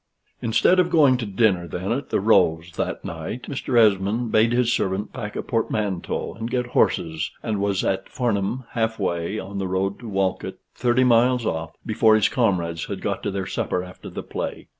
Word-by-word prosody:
Instead 145 +11 +3
of 180 -1 +3
going 150 -7 +5
to 120 -3 -3
dinner 95 -3 +2
then 90 +5 -4
at 130 +3 -2
the - - +1
"Rose" 90 -5 +3
that - - -4
night, 85 +9 -5
Mr. 135 -3 -2
Esmond 110 +2 +3
bade 110 +2 +4
his 120 -1 +2
servant 95 0 -1
pack 105 -4 -6
a - - -3
portmanteau 110 -5 -2
and 115 +1 -5
get 125 0 0
horses, 80 -9 +1
and 105 -2 -1
was 100 -2 0
at 95 - -1
Farnham, 120 0 -1
half 110 -1 -1
way 85 0 -2
on 100 0 -5
the 95 - -2
road 95 +2 -1
to 120 - -8
Walcote, 95 -2 -1 0.2
thirty 125 +1 +2
miles 125 0 +4
off, 80 -3 -3
before 110 0 +4
his 110 - +3
comrades 85 -9 0
had - - -5
got - - -2
to - - -2
their 95 -1 -3
supper 90 - -2
after 90 0 -10
the - - -6
play. - - -5
105 Hz, 190 wpm, -23 LUFS, 95-120 Hz, 0.2 s, going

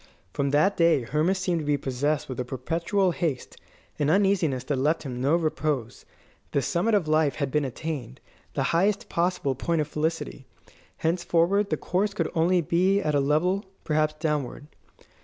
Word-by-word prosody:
From 140 -1 0
that 155 +8 +3
day 165 -6 +4
Hermas 155 +10 +1
seemed 180 -2 0
to - - -4
be 145 0 +2
possessed 140 +3 -1
with 130 -2 -6
a - - 0
perpetual 170 +9 0
haste, 160 -7 -3 0.4
an 145 -1 +2
uneasiness 180 -8 +2
that 135 +1 -1
left 155 +5 +1
him 125 -3 -5
no 140 +5 +3
repose. 150 -7 -2 0.5
The 140 - +2
summit 195 - +1
of 185 -6 +1
life 155 -2 +2
had 140 -3 -2
been 150 0 +1
attained, 130 -2 -5 0.4
the 135 - +1
highest 195 +4 +1
possible 170 -5 0
point 165 +5 -1
of 150 - 0
felicity. 155 -3 -3 0.5
Henceforward 175 +4 +1
the - - 0
course 200 +2 -1
could - - -1
only 175 +1 +3
be 185 +5 +2
at 155 -6 -1
a 145 - +3
level 165 +8 +1 0.2
perhaps 155 0 +1
downward. 150 -3 -2
155 Hz, 170 wpm, -26 LUFS, 140-175 Hz, 0.5 s, day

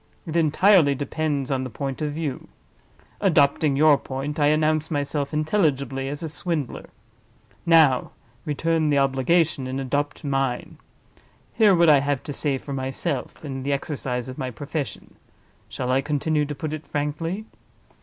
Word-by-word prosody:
It 165 -2 -6
entirely 165 -1 +4
depends 145 -1 -2
on 130 -1 0
the 130 - -5
point 135 +3 -5
of 150 -1 -1
view. 150 -3 -4 0.7
Adopting 150 -5 +3
your 150 0 +5
point, 140 +4 -5
I 145 - +4
announce 155 +1 +2
myself 145 -1 -2
intelligibly 145 -5 0
as 145 +3 -5
a - - -2
Swindler. 160 -3 -3 0.8
Now 155 -6 +5 0.3
return 155 +1 0
the 145 - +3
obligation, 135 +2 +2
and 130 +1 -3
adopt 145 +4 -2
mine. 135 -3 -2 0.7
Hear 210 -4 +5
what 170 0 +4
I 150 -2 +7
have 140 -1 -1
to 145 - -5
say 140 -1 -1
for 140 +1 -7
myself, 135 +2 -3
in 135 -2 -5
the 140 +2 -1
exercise 130 -3 -3
of 130 +3 -8
my 130 -2 -2
profession.—Shall 135 -1 -7
I 130 +1 +3
continue 150 +1 0
to 145 0 -5
put 155 +2 -4
it 155 0 -7
frankly?" 165 +7 -3
145 Hz, 150 wpm, -24 LUFS, 135-155 Hz, 0.8 s, I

